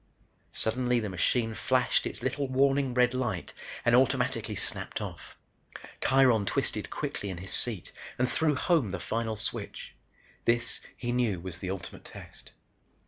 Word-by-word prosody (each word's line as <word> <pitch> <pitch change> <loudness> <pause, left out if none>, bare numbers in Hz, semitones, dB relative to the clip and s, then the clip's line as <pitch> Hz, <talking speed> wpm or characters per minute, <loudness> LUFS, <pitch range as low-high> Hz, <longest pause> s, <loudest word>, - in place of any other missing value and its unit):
Suddenly 125 +2 +1
the 105 -2 -2
machine 115 +5 +1
flashed 125 +2 +2
its - - -7
little 140 -1 0
warning 135 0 +2
red 125 0 +4
light 120 -9 -2 0.3
and 120 0 +6
automatically 130 0 +2
snapped - - -4
off. - - -7 0.6
Kiron 125 -6 +4
twisted - - 0
quickly 100 - -3
in 95 - -4
his 95 +2 -4
seat 110 -7 +1 0.3
and 125 - +2
threw 155 +2 +2
home 150 - +2
the 95 0 -3
final 110 +3 -1
switch. 105 - -5 0.5
This, 115 0 +1 0.2
he 120 -1 -2
knew, 120 -7 +1
was 90 0 -4
the 90 - -4
ultimate 95 -2 -6
test. - - -9
120 Hz, 145 wpm, -30 LUFS, 100-130 Hz, 0.6 s, and